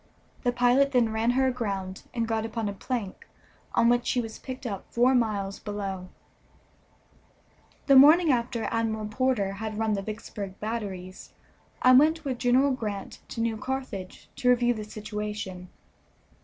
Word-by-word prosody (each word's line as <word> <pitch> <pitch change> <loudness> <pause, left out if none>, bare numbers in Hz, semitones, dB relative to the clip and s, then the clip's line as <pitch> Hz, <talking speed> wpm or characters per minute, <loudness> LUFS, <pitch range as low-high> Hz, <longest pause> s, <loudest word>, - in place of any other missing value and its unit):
The 245 - +1
pilot 245 +3 +3
then 240 -3 +3
ran 220 +1 +1
her 265 - +4
aground, 200 -7 -3
and 230 -2 -2
got 225 -1 0
upon 225 -1 -3
a 200 - -3
plank, 210 -1 -5 0.5
on 230 - +4
which 245 0 +2
he 250 - +1
was 225 -2 -5
picked 260 0 -8
up 200 -5 -4
four 245 +2 +4
miles 205 -5 0
below. 195 -3 -5 1.8
The 275 - +5
morning 305 +4 +8
after 235 -2 -1
Admiral 220 -1 -1
Porter 215 -2 0
had 215 +1 -5
run 220 -1 +1
the 200 - -1
Vicksburg 205 -2 -7
batteries 200 -4 -5 0.5
I 255 - +7
went 310 +5 +5
with 255 -3 -2
General 255 +3 +3
Grant 210 -6 -4
to 230 - -5
New 230 -1 0
Carthage 260 -7 -5
to 250 - +2
review 245 0 +4
the 215 -2 -6
situation. 210 -4 -6
225 Hz, 155 wpm, -27 LUFS, 205-250 Hz, 1.8 s, morning